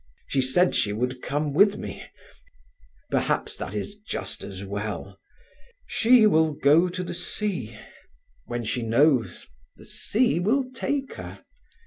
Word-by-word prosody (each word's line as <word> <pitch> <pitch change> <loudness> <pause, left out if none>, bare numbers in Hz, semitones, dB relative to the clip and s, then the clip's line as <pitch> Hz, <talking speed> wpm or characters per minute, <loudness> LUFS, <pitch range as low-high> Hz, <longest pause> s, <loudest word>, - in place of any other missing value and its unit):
"She 135 - 0
said 175 +8 +3
she 105 - +2
would 125 +3 -2
come 145 +1 -2
with 200 +6 +5
me—perhaps - - -6
that 100 - -6
is 105 - -3
just 210 - -5
as 95 0 -7
well. 100 -1 -5 0.7
She 235 0 +5
will 160 -6 +4
go 150 +5 +4
to 180 +1 -4
the - - -5
sea. 190 +2 -3 0.7
When 120 -1 -3
she 120 +3 -2
knows, 120 +3 +2 0.3
the - - -15
sea 235 -5 +1
will 240 +9 +2
take 275 +2 -2
her. - - -9
145 Hz, 130 wpm, -25 LUFS, -, 0.7 s, with